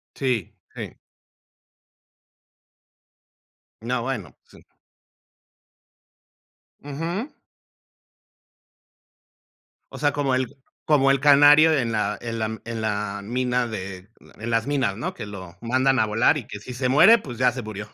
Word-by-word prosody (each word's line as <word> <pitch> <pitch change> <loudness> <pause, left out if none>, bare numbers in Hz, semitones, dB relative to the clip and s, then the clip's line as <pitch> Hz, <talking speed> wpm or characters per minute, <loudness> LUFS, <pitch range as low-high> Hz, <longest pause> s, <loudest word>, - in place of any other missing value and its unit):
Sí, 125 -8 -2 0.2
sí. - - -7 2.9
No, 120 +1 -2
bueno, 115 - -5
sí. - - -19 2.2
Ujú. 170 - -4 2.6
O - - -9
sea, 145 -1 +1
como 140 -3 0
el 130 0 -2 0.3
como 135 -3 +3
el 135 - +2
canario 145 +2 +7
en 120 -4 -1
la 105 -1 -1
en 115 -1 -5
la 110 0 -3
en 115 -1 -5
la 105 -2 -2
mina 125 +1 -1
de 95 -3 -7 0.3
en 115 +2 -5
las 115 +1 +1
minas, 135 -8 0
¿no?, 120 - -4
que - - -7
lo 95 -3 -10
mandan 130 +2 +1
a 110 - +3
volar 115 +8 +3
y 120 - -8
que 105 - -8
si 125 +3 -9
se 130 +1 -1
muere, 175 - +7
pues 125 - -9
ya 125 -1 +3
se 125 0 -6
murió. 105 -1 -7
125 Hz, 130 wpm, -23 LUFS, 110-135 Hz, 2.9 s, canario